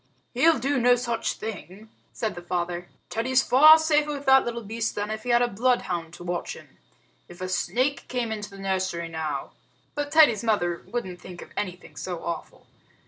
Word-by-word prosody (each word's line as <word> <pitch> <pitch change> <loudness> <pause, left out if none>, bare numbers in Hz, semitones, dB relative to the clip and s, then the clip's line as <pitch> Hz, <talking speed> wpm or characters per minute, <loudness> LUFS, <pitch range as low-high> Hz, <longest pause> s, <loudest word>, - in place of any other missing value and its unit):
"He'll 315 +6 +4
do 270 +3 0
no 245 +1 +5
such 235 -2 -2
thing," 210 -1 -8 0.2
said 220 -3 -3
the 175 - -8
father. 175 0 -3 0.2
"Teddy's 260 +3 +2
safer 305 +2 +6
with 285 -1 -6
that 265 0 +6
little 235 -1 -4
beast 225 +2 -3
than 205 +1 -3
if 215 0 -4
he 245 - -6
had 240 0 +4
a - - +2
bloodhound 195 -8 -1
to - - -11
watch 175 0 -3
him. - - -16 0.5
If 175 - -13
a 185 - -3
snake 240 +10 -1
came 245 -3 -2
into 210 -2 -5
the 195 - -12
nursery 185 -3 -2
now 155 -4 -4 0.2
" 125 - -39
But 290 0 -3
Teddy's 285 -10 +5
mother 175 -7 0
wouldn't 190 -7 -5
think 180 -1 -9
of - - -16
anything 180 -5 -5
so 170 +5 -5
awful. 170 -1 -6
215 Hz, 190 wpm, -25 LUFS, 175-250 Hz, 0.5 s, safer